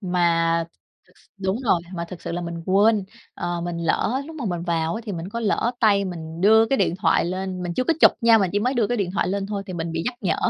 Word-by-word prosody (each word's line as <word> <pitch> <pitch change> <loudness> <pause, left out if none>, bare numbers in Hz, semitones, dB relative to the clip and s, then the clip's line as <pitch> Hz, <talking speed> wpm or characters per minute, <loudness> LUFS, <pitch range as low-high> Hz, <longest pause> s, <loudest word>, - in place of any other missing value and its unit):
Mà 170 -3 +1 0.7
đúng 190 +1 -1
rồi, 185 -7 +3 0.2
mà 170 - -3
thật 180 -1 -9
sự - - -5
là 175 - -2
mình 170 -1 -5
quên, 205 +1 +3 0.3
ờ, 175 0 -3
mình 170 0 -4
lỡ, 215 +10 0
lúc 320 0 -9
mà 280 - -5
mình 175 -3 -2
vào 170 +3 -1
thì 205 - -5
mình 170 +1 -5
có 230 +4 -4
lỡ 225 +1 +1
tay 200 -3 +4
mình 165 -2 -6
đưa 220 +3 +6
cái 270 - +1
điện 175 - +1
thoại 190 - +2
lên. 185 +1 -3
Mình 175 -1 -4
chưa 255 - 0
có 330 - +2
chụp - - +8
nha, 230 -1 +6
mình 190 -4 +1
chỉ 205 - +2
mới 250 +5 0
đưa 230 -4 +2
cái 245 - -1
điện 195 -5 -1
thoại - - 0
lên 195 +1 -2
thôi 200 -1 -4
thì 185 - -6
mình 165 -1 -4
bị 165 - -2
nhắc 250 - -1
nhở. 190 - +1
190 Hz, 265 wpm, -23 LUFS, 170-215 Hz, 0.7 s, chụp